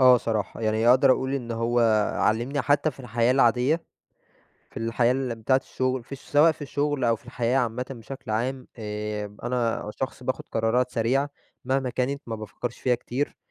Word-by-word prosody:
آه، 130 -1 +8
صراحة. 110 -1 -2
يعني 110 +1 +2
أقدر 130 +2 +6
اقول 130 +1 -1
إن 125 -4 -4
هو 115 +1 +1 0.4
علّمني 120 +6 +1
حتى 145 +2 +2
في 135 - -14
الحياة 120 -1 +1
العادية، 130 +5 +3 0.9
في - - -9
الحياة 115 +1 +2
الم 130 -2 -1
بتاعة 130 +4 +4
الشغل، 130 -1 -2
في 140 - -7
ش - - -16
سواء 150 +3 +4
في 155 - -13
الشغل 145 -1 -1
أو 115 -1 +3
في 110 - -18
الحياة 120 +1 0
عامةّ 125 0 0
بشكل 125 -2 -7
عام، 125 +4 -2
آمم، 105 -1 -4
أنا 120 -3 -1
شخص 130 -1 -4
باخد 130 +1 -2
قرارات 120 +3 +1
سريعة، 130 +6 +1 0.4
مهما 130 0 0
كانت 135 +3 -1
ما 115 - -3
بافكرش 110 +2 -6
فيها 125 -1 +2
كتير، 125 +4 -3
125 Hz, 180 wpm, -26 LUFS, 115-135 Hz, 0.9 s, آه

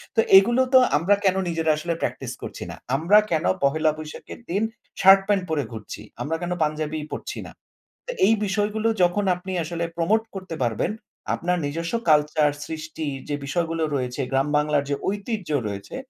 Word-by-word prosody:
তো - - +2 0.2
এগুলো 235 +6 +5
তো 260 - +9 0.2
আমরা 180 +7 +3
কেন 190 -1 +4
নিজেরা 165 -1 +1
আসলে 170 +2 -2
প্র্যাকটিস - - -3
করছি - - -7
না? - - -6 0.2
আমরা 170 +8 +4
কেন 160 -1 +1 0.2
পহেলা 155 +2 +3
বৈশাখের 155 +7 -9
দিন 200 +5 0 0.4
শার্ট-প্যান্ট 195 +1 +6
পরে 150 -3 0
ঘুরছি? 110 -2 -8 0.2
আমরা 160 +3 -1
কেন 175 0 -3
পাঞ্জাবি 155 0 -2
পড়ছি - - -5
না? - - -10 0.6
তো - - -2
এই 215 - +5
বিষয়গুলো 210 +2 0 0.2
যখন 175 +4 +2
আপনি 185 +1 -8
আসলে 170 +1 -4
প্রমোট 205 +7 +2
করতে 185 -3 -6
পারবেন 115 - 0 0.4
আপনার 180 +1 -1
নিজস্ব 165 +7 -3 0.2
কালচার 150 0 +4
সৃষ্টির 155 -2 -5
যে 145 - 0
বিষয়গুলো 165 +2 -1
রয়েছে 125 +1 -2
গ্রাম 135 +1 +2
বাংলার 150 -1 +1
যে 140 - +1
ঐতিহ্য 205 -2 -3 0.2
রয়েছে 100 -1 -6
165 Hz, 165 wpm, -24 LUFS, 150-195 Hz, 0.6 s, তো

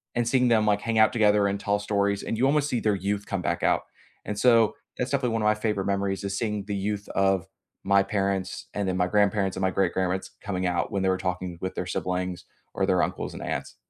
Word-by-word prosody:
and 120 -1 +1
seeing 125 +1 +3
them, 110 -2 +4
like, 105 -1 +2
hang 115 0 -1
out 110 - +5
together 105 -3 +4
and 100 0 -1
tell 100 0 0
stories, 100 -1 0
and 115 - -3
you 130 - +2
almost 145 +1 +2
see 125 - 0
their 105 -2 +2
youth 100 +2 -2
come - - -3
back - - -2
out. - - +2 0.4
And 105 -1 -4
so 115 -3 +4 0.2
that's 125 +2 -2
definitely 130 -4 0
one 115 - 0
of - - 0
my 105 0 +4
favorite 105 -3 -1
memories 100 -1 -1
is 100 0 -2
seeing 105 -3 -2
the 100 0 -3
youth 100 +1 -3
of 95 -3 +1 0.4
my 100 0 +4
parents, 100 -2 -2
and 100 -2 -2
then 90 - -1
my 90 -1 +2
grandparents 100 -1 +2
and 95 - -3
my 95 - +2
great-grandparents 95 0 0
coming 95 -2 -2
out 90 -1 -1
when 100 - -1
they 95 - +2
were 95 - +2
talking 90 -1 -3
with 95 0 -4
their 90 - -3
siblings 90 0 -3 0.3
or - - 0
their - - +2
uncles - - -3
and - - -8
aunts. - - -4
100 Hz, 240 wpm, -26 LUFS, 95-105 Hz, 0.4 s, out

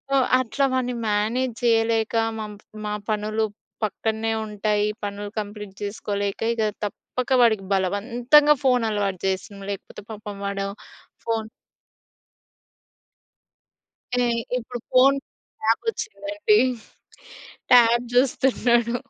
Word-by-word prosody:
ఓహ్! 265 -2 +4
అట్లా 255 +3 0
వాడిని 250 -1 0
మేనేజ్ 225 +5 0
చేయలేక 225 -1 +2 0.2
మామ్ 210 -1 -6 0.3
మా 210 - -2 0.2
పనులు 215 +1 0 0.4
పక్కన్నే 220 +1 -2
ఉంటాయి. 210 0 0 0.2
పనులు 205 0 -5
కంప్లీట్ 210 -1 -7
చేసుకోలేక, 200 -1 -3
ఇగ 230 - -2 0.2
తప్పక 250 +5 -5
వాడికి 220 -4 +3
బలవంత్తంగా 240 +10 +4
ఫోన్ 250 -2 +4
అలవాటు 200 -3 -1
చేసినం. 195 +1 -3
లేకపోతే 200 - -8
పాపం 210 -1 -7
వాడు 200 0 -2 0.6
ఫోన్ 225 -1 -1 2.8
ఏయ్ 235 -1 +1 0.2
ఇప్పుడు 245 0 -6
ఫోన్ 270 +2 +6 0.4
ట్యాబ్ 225 +1 +2
వచ్చిందండి. 420 -2 0 1.1
ట్యాబ్ 240 -1 +6
చూస్తున్నాడు. 245 -2 +2
225 Hz, 95 wpm, -24 LUFS, 205-245 Hz, 2.8 s, ఫోన్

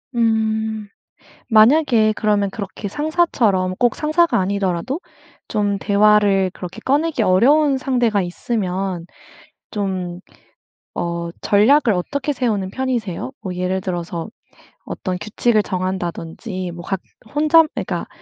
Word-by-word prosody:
음. 220 -2 0 0.6
만약에 225 -1 +5
그러면 205 -2 +1
그렇게 200 0 -6
상사처럼 235 - +1
꼭 245 -1 +2
상사가 320 +3 +2
아니더라도 195 - -1 0.5
좀 205 -1 0
대화를 200 -2 +3
그렇게 180 +4 -8
꺼내기 290 -2 +1
어려운 270 +10 +4
상대가 245 -6 +1
있으면 185 -1 -3 0.7
좀 185 -4 -3 0.7
어 170 0 -3
전략을 225 +3 +4
어떻게 280 +11 -2
세우는 215 -8 -1
편이세요? 245 -3 -3
뭐 185 -2 -5
예를 185 +1 -1
들어서 175 -2 -4 0.6
어떤 185 -2 -4
규칙을 215 +2 +1
정한다든지 185 +1 -4
뭐 175 0 -9
각 195 +1 -2 0.3
혼자 310 +3 +5
그니까 - - -3
210 Hz, 265 characters per minute, -20 LUFS, 185-245 Hz, 0.7 s, 만약에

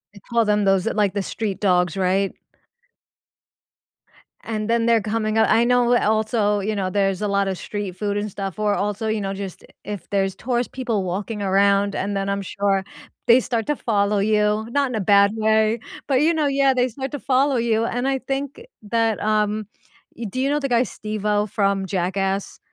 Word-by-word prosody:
I 200 - -12
call 230 +2 0
them 210 -1 +2
those, 195 0 +2
eh, - - +1
like, 205 -3 +1
the 200 - -1
street 205 -2 -4
dogs, 180 -2 +2
right? 190 +1 +1 2.1
And 215 -1 -4
then 230 0 +2
they're 230 -2 +4
coming 215 +1 -1
u - - +5
I 230 +1 +4
know 245 0 +3
also, 215 -1 +1
you 210 +2 -2
know, 190 -2 -1
there's 195 0 0
a 210 - 0
lotta 200 -1 0
street 200 -1 -5
food 205 +1 -2
and 210 +1 -2
stuff, 195 0 -6
or 210 -1 +2
also, 210 +2 -2
you 220 -1 -1
know, 195 -1 -3
just 195 -2 -7 0.2
if 205 -5 -6
there's 195 -1 0
tourist 245 0 -2
people 235 -7 -1
walking 205 +4 -4
around 200 +1 +2
and 200 +1 -2
then 195 0 -2
I'm 200 0 -1
sure 195 0 0 0.4
they 235 +2 +6
start 230 -3 -2
to 295 - +1
follow 205 -4 +1
you, 210 +1 +1
not 280 +1 +1
in 250 - -4
a - - 0
bad 200 +1 +5
way, 220 +1 +2 0.3
but, 275 - +1
you 325 +2 +3
know, 310 -3 +1
yeah, 275 -1 +3
they 255 0 +1
start 265 +3 -6
to 290 - -4
follow 270 +1 +2
you, 230 -1 +1
and 245 +2 -2
I 270 -1 0
think 275 - -4 0.2
that, 225 0 0
um, 215 0 0 0.5
y 235 - -5
do 255 - -3
you 270 - +1
know 295 +1 +1
the 275 - -2
guy, 240 0 +3
Steve-O, 210 -2 -2
from 195 -1 0
Jackass? 190 +2 -2
210 Hz, 200 wpm, -22 LUFS, 200-235 Hz, 2.1 s, they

